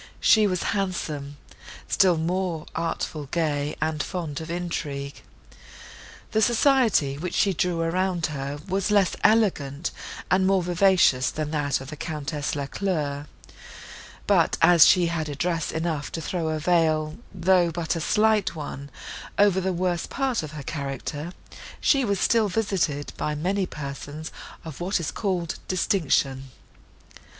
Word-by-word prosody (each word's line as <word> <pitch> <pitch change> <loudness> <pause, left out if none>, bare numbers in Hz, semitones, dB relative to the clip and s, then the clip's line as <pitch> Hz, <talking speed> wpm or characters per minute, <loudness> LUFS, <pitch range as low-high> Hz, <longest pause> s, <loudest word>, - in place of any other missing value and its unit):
She 215 -2 +5
was 185 -3 -1
handsome, 155 -8 -3 0.5
still 185 -3 +4
more 170 0 -1
artful, 160 -3 -3
gay 150 -2 -1
and 155 -1 -1
fond 165 -5 -4
of 160 - -8
intrigue. 150 -5 -4 1.1
The 220 - +2
society, 230 - +3
which 180 +2 -4
she 195 - +3
drew 175 -1 0
round 180 -1 0
her, 140 -2 -4
was 195 +2 0
less 200 -3 +3
elegant 175 -9 +2 0.4
and 185 +1 +4
more 190 -1 +3
vicious, 175 -8 +3
than 155 -1 -4
that 145 -2 0
of 135 +3 -9
the - - -5
Countess 150 -1 -3
Lacleur: 145 -1 -2 1.0
but, - - +3
as 170 -3 +8
she 180 -2 +5
had 165 -2 -2
address 165 +3 -1
enough 160 -3 -2
to - - -3
throw 165 0 -2
a 155 0 -1
veil, 155 -1 +1
though 180 -1 +3
but 165 0 -2
a 165 - -3
slight 210 +1 +2
one, 140 -2 -6 0.5
over 200 -2 +4
the 190 +1 0
worst 180 -1 -1
part 270 -3 0
of 155 -1 -7
her 150 -2 -7
character, 145 +2 -4 0.5
she 275 -2 +3
was 200 -5 0
still 225 -3 +3
visited 185 -8 -1
by 150 - -2
many 185 +5 0
persons 145 +1 -7 0.3
of 160 0 -8
what 185 +2 0
is 165 - -3
called 180 -5 -2
distinction. 140 -8 0
170 Hz, 140 wpm, -25 LUFS, 150-185 Hz, 1.1 s, as